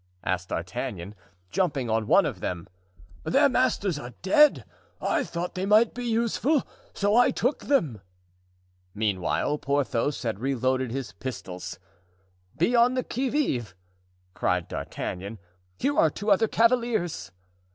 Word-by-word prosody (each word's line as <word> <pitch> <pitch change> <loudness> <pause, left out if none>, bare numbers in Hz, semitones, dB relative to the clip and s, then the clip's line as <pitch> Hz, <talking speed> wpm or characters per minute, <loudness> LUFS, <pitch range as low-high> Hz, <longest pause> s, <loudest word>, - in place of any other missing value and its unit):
asked 95 0 -2
D'Artagnan, 90 +2 -4 0.4
jumping 150 -8 0
on 110 -1 0
one - - +5
of - - -3
them. 90 -2 -4 0.6
"Their 285 +2 +4
masters 205 - +1
are 125 -4 -9
dead! 300 +11 +5 0.3
I - - +1
thought 175 +1 -4
they 190 +1 -2
might 215 +2 +5
be 245 0 -5
useful, 235 +5 +1 0.3
so 205 +1 +1
I 245 +1 +6
took 255 +5 -1
them." 150 - +1 0.9
Meantime 105 +7 0
Porthos 140 -1 0
had 110 -4 -2
reloaded 130 0 0
his 130 0 -4
pistols. 95 -8 -6 0.8
"Be 175 +10 +2
on 240 +2 +5
the 255 - 0
qui 260 +2 -2
vive!" 125 - -1 0.6
cried 90 -1 0
D'Artagnan. 100 +5 -5 0.4
"Here 285 +3 0
are 160 - +5
two 205 +7 -2
other 200 +3 +4
cavaliers." 225 - +1
150 Hz, 130 wpm, -26 LUFS, -, 0.9 s, I